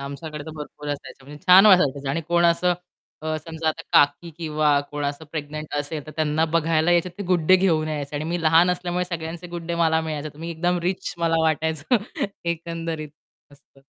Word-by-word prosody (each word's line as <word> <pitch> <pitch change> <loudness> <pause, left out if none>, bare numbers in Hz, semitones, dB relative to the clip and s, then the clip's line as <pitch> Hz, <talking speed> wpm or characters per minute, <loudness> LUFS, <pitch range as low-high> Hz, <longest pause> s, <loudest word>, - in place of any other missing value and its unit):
आमच्याकडे 145 +2 -7
तर 160 - -7
भरपूर 150 0 -8
असायचं 140 -2 -6
म्हणजे 145 +4 -12
छान 185 +3 +9
वाटायचं 145 -8 +4
आणि 155 +4 -1
कोण 175 0 +3
असं 175 +1 +3 0.5
अ, 155 0 -1
समजा 160 +1 -4
आता 155 - -2
काकी 145 +4 +4
किंवा 150 -3 +2
कोण 145 0 -4
असं 145 +2 -3
प्रेग्नंट 155 -1 -5
असेल 150 0 -6
तर - - -8
त्यांना 155 0 +1
बघायला 160 +1 +2
यायचेत 175 +1 +2
ते - - -3
Good 175 -3 +1
Day 185 - +9
घेऊन 160 -5 +2
यायचे 145 -1 -4
आणि 150 - -3
मी 175 0 -1
लहान 165 +3 +5
असल्यामुळे 180 0 -1
सगळ्यांचे 170 0 -6
Good 170 -1 -6
Day 170 - -1
मला 160 -1 +3
मिळायचे. 155 -2 -4
मी 165 +1 -5
एकदम 175 +2 0
रिच 180 +1 -2
मला 165 -1 +2
वाटायचं 160 - +1 0.6
एकंदरीत 165 -2 -5 0.4
असतं. 140 -1 -22
160 Hz, 190 wpm, -23 LUFS, 150-170 Hz, 0.6 s, छान